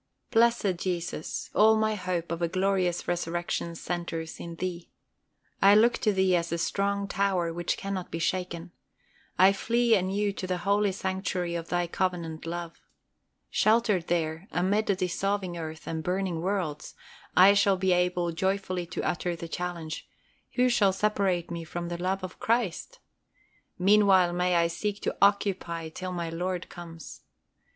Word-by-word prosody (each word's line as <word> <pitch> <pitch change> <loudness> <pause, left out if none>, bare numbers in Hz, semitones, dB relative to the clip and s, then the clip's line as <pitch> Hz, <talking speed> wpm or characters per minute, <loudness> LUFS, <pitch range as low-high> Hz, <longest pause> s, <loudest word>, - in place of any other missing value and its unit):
Blessed 230 -5 +3
Jesus, 175 -3 -3
all 220 +1 +6
my 220 0 +1
hope 180 -4 -3
of 170 0 -3
a 170 - +2
glorious 185 0 0
resurrection 175 -1 -2
centres 165 -2 -4
in 170 -1 -7
Thee. 175 0 -5 0.7
I 200 +1 +7
look 235 +3 +4
to 215 - +2
Thee 190 -2 +3
as 170 -1 0
the 170 - -1
strong 200 +3 -1
tower 190 -5 0
which 175 0 -2
cannot 195 -2 -4
be - - -4
shaken. 175 0 -2 0.7
I 190 +2 +7
flee 235 +3 +2
anew 200 +1 +1
to 185 - -5
the 180 0 -1
holy 200 +2 +2
sanctuary 185 -2 -2
of 170 -1 -4
Thy 175 0 +1
covenant 170 -2 -2
love. 170 0 -5 0.7
Sheltered 215 -5 +2
there, 165 +1 -1
amid 200 +5 +1
a 200 - +4
dissolving 185 0 -1
earth, 160 -1 -6
and 160 -1 -3
burning 180 -1 -1
worlds, 180 -5 -2 0.4
I 190 +2 +9
shall 200 -1 +3
be 185 0 +2
able 180 -1 +1
joyfully 185 0 -1
to 170 - -4
utter 175 0 -1
the 170 0 -7
challenge, 170 -2 -5 0.4
"Who 250 0 +3
shall 205 -5 +3
separate 190 -4 0
me 170 -1 -4
from 170 +1 -5
the 175 0 -4
love 190 +1 -1
of 185 -1 -7
Christ?" 230 - -1 0.8
Meanwhile 190 -2 +5
may 180 0 +1
I 170 0 +4
seek 205 +5 -2
to - - -1
"occupy" 190 -5 +1
till 185 +3 -6
my 170 -2 -3
Lord 180 +1 -3
comes. 165 -2 -10
180 Hz, 155 wpm, -28 LUFS, 170-200 Hz, 0.8 s, I